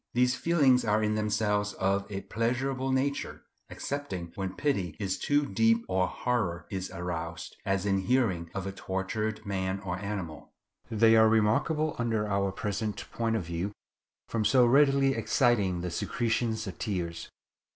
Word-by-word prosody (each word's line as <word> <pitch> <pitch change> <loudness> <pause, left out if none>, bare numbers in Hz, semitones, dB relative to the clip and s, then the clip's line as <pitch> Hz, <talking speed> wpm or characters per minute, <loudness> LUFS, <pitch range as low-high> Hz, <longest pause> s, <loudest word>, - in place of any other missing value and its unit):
These 125 0 +4
feelings 135 -5 +3
are 110 -1 +2
in 105 0 +1
themselves 105 -1 0
of 100 +2 -1
a 100 -1 -3
pleasurable 130 +5 -1
nature, 140 +2 -1 0.3
excepting 95 -13 -4
when 95 -1 -4
pity 100 - -1
is 95 -3 -2
too 145 0 +2
deep, 115 +1 +2
or 95 0 +1
horror 110 -9 -1
is 95 -1 -3
aroused, 85 -2 -5
as 95 -1 +1
in 95 -1 +2
hearing 95 -6 +1
of 95 -2 -3
a 95 - -3
tortured 100 +3 -3
man 95 -1 -2
or 90 -2 -4
animal. 100 -6 -6 0.4
They 115 0 +5
are 110 0 +6
remarkable 115 +9 +2
under 110 -3 0
our 100 -1 0
present 105 +2 -3
point 115 -1 0
of 110 - -1
view 85 +4 -3 0.5
from 115 -2 -1
so 125 +2 +5
readily 135 +1 +4
exciting 105 -11 +2
the 90 0 -3
secretion 115 +4 0
of 110 -5 -6
tears. 85 -5 -3
105 Hz, 150 wpm, -29 LUFS, 95-120 Hz, 0.5 s, are